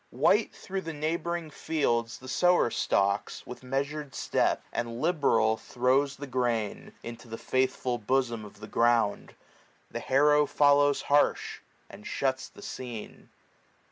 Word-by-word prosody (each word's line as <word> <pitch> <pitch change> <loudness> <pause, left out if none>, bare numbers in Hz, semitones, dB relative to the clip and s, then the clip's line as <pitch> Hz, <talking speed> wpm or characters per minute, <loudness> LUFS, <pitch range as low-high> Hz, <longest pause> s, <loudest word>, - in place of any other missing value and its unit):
White 175 - +2
thro' 195 0 -5
the 165 -2 -6
neighboring 165 +1 -2
fields 120 -9 -1
the 130 - -12
sower 180 -2 +3
stalks, 100 +1 0
With 125 - -9
measured 140 +2 -3
step; - - +1
and 115 0 -3
liberal 135 -9 +2
throws 130 +4 +1
the 145 - -7
grain 120 -5 -1
45 - - -15
Into 115 +1 -8
the 115 0 -6
faithful 130 -1 0
bosom 120 0 0
of 105 0 -13
the 105 - -7
ground: 115 -2 +1 0.6
The - - -4
harrow 150 +2 +4
follows 145 0 +4
harsh, 145 +1 +2 0.3
and 105 - -11
shuts 130 -1 -1
the - - -14
scene. 120 -4 -8
130 Hz, 140 wpm, -28 LUFS, 115-150 Hz, 0.6 s, harrow